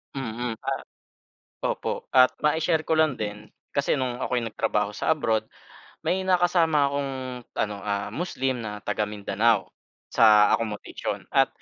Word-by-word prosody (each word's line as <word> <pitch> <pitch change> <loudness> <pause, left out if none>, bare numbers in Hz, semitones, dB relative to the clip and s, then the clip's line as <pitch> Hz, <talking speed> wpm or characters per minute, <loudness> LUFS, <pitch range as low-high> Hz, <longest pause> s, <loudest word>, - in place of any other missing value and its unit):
Mm, 120 -2 -3
pa - - -3 0.8
opo - - -3
at 130 -1 +6
ma-i-share 160 +1 +2
ko 160 - +3
lang 155 -6 +2
din. 105 0 -5 0.2
Kasi 140 +1 0
no'ng 125 -1 -2
ako'y 125 - 0
nagtrabaho 105 -2 -1
sa - - +2
abroad, 115 -8 0 0.6
may 185 - +1
nakasama 175 -5 +3
akong 140 -1 -2 0.4
ano, 105 -1 -1
ah, 100 0 -2
Muslim 135 -7 -2
na 105 -2 -6
taga-Mindanao 105 0 0 0.4
sa 105 -2 +6
accomodation. 110 -2 -3
At - - +5
120 Hz, 130 wpm, -26 LUFS, 105-150 Hz, 0.8 s, at